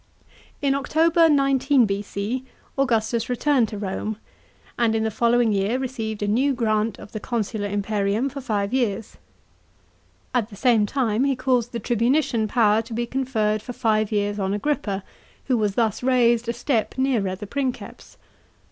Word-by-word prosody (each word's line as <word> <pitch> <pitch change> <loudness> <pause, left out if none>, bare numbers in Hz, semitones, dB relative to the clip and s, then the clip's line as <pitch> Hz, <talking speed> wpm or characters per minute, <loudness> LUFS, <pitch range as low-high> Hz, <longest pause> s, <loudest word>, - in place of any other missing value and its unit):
In 275 -1 +3
October 325 +4 +3
19 275 -2 +3
B.C. 205 +4 -3 0.3
Augustus 230 -3 0
returned 250 -1 +2
to 210 - -6
Rome, 205 +2 -3 0.6
and 230 -2 +1
in 220 - +1
the 220 - -1
following 235 +1 +2
year 200 +5 +1
received 225 -5 -4
a - - -1
new 260 +7 +2
grant 215 -2 0
of - - -12
the 215 - -5
proconsular 215 -2 -2
imperium 205 +3 0
for 275 +1 -6
five 210 -4 -2
years. 225 -4 -1 1.2
At 235 -3 0
the 205 - -11
same 225 -1 +3
time 240 -2 0
he 275 -1 +1
caused 250 -2 0
the 235 - -4
tribunician 240 0 +1
power 220 -2 +3
to 230 +1 -9
be 240 +1 -1
conferred 230 -5 -1
for 245 +3 -7
five 220 -3 +1
years 205 0 0
on 195 0 0
Agrippa, 205 -5 -2 0.4
who 260 - +1
was 210 -3 0
thus 220 -3 0
raised 240 -2 +2
a - - 0
step 240 -1 -1
nearer 235 -8 +1
the 200 - -8
Princeps. 260 +3 -5
230 Hz, 160 wpm, -23 LUFS, 210-260 Hz, 1.2 s, In